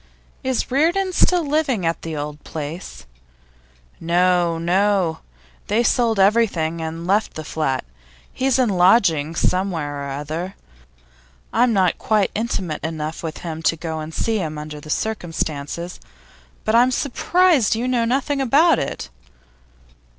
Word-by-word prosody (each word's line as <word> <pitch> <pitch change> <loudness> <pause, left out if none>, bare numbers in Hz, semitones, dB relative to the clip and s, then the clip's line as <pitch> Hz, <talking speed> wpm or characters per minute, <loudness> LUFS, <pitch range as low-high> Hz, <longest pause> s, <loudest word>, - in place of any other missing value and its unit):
'Is 260 -2 -1
Reardon 345 +7 +2
still 355 -2 +3
living 280 - 0
at 165 0 -1
the 160 -2 -5
old 150 0 -6
place?' 155 - -7 0.9
'No, 175 0 +2
no. 180 0 +1 0.5
They 220 +4 +2
sold 235 -2 +2
up - - +7
everything 175 -7 +1
and 165 +1 -5
let 200 +4 +2
the 155 - -5
flat. 150 - -2 0.5
He's 265 0 +1
in 255 -3 +3
lodgings 175 -5 +3
somewhere 160 -7 -1
or 140 - -5
other. 155 +7 -4 1.0
I'm 245 0 +4
not 190 -5 +2
quite 215 -3 +1
intimate 195 -8 -3
enough 160 0 -4
with 160 -2 -5
him 160 -1 -4
to 165 - +2
go 160 -1 -5
and 155 +1 -6
see 220 +6 -1
him 155 -4 -3
under 150 0 -7
the 155 - -12
circumstances. 170 -4 -3 0.7
But 215 - +1
I'm 240 +2 +5
surprised 285 - +2
you 235 +3 -2
know 250 -2 +1
nothing 275 +4 0
about 285 +4 +4
it. 100 - -4
180 Hz, 140 wpm, -21 LUFS, 160-235 Hz, 1.0 s, up